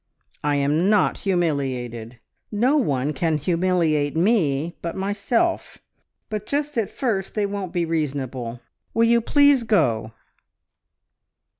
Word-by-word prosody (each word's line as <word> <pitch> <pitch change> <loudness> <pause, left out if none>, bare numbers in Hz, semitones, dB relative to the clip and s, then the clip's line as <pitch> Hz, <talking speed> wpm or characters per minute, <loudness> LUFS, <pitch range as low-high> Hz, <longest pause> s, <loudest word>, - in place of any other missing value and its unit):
I 145 0 +1
am 150 +6 +2
not 210 -3 +2
humiliated! 130 - -2 0.3
No 240 +7 +2
one 145 - 0
can 160 +2 0
humiliate 165 -2 +1
me 165 -5 +1
but 170 - -4
myself; 205 - -1 0.5
but 215 -1 -5
just 295 +1 -2
at 225 -5 0
first 210 -8 -2
they 210 -2 +1
won't 200 -3 -4
be 175 -1 0
reasonable.... 130 -7 -3 0.3
Will 230 0 +4
you 235 0 +4
please 285 +2 +4
go?" 115 - +1
175 Hz, 120 wpm, -23 LUFS, 140-215 Hz, 0.5 s, Will